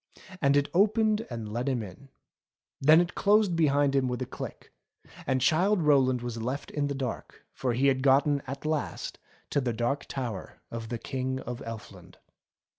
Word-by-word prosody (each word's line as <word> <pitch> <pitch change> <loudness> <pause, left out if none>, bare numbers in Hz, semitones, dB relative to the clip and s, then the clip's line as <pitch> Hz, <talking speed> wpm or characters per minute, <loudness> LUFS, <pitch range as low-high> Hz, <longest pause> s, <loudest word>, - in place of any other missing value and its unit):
And 140 -1 +4
it 145 0 +2
opened 215 +3 +3
and 115 -3 -6
let 120 +4 -1
him 125 -4 -1
in. 105 +8 -12 0.7
Then 155 +4 +7
it 175 0 -2
closed 205 -3 +3
behind 145 -3 +3
him 135 -2 +2
with 125 -1 -2
a - - -4
click, - - -8 0.5
and 130 -1 +1
Childe 175 +6 +3
Rowland 130 -4 +3
was 120 -2 -4
left 130 +5 -4
in 145 -1 -1
the 140 - -3
dark; 130 -3 -5
for 125 -2 -1
he 130 +4 +1
had 135 -1 +3
gotten 140 +1 +4
at 135 +3 -6
last 155 -1 -3 0.3
to 145 - +2
the 125 -2 -1
Dark 120 +5 -1
Tower 120 -8 -5
of 115 -1 -6
the 120 - -2
King 130 +2 -3
of 120 0 -6
Elfland. 115 -1 -9
135 Hz, 180 wpm, -28 LUFS, 120-150 Hz, 0.7 s, Then